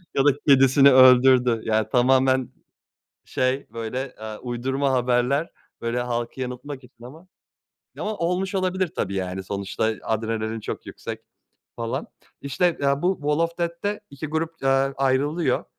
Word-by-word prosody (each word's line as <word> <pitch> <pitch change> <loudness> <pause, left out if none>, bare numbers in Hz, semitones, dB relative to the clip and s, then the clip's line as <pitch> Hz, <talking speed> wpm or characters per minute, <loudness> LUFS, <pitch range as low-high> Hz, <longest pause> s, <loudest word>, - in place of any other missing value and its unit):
ya 135 - +2
da - - +7 0.2
kedisini 135 0 +6
öldürdü. 125 -2 +6
Ya, 110 -1 +1
tamamen, 130 0 +3 0.8
şey 130 +2 -1
böyle, 125 +4 -5
eee, 110 -1 -6
uydurma 130 +3 -1
haberler, 125 +5 +1 0.3
böyle 115 +1 -1
halkı 120 +1 -3
yanıltmak 130 +2 -6
için 120 -1 -18
ama 160 +9 -12 0.7
ama 215 0 -3
olmuş 180 +3 -1
olabilir 185 -1 0
tabii, 100 0 -2
yani 95 0 -3
sonuçta 100 +3 -2
adrenalin 110 0 -2
çok - - -6
yüksek - - -7 0.6
falan. 115 -1 -3 0.4
İşte, 170 +5 0
eee, 140 +1 +1
bu 185 +2 +2
wall 150 +1 0
of 165 +1 -1
death'te 175 +5 -2
2 140 +3 -6
grup, 160 +2 -2
eee, 135 - +1 0.3
ayrılıyor, 140 +5 +1
130 Hz, 135 wpm, -24 LUFS, 120-150 Hz, 0.8 s, da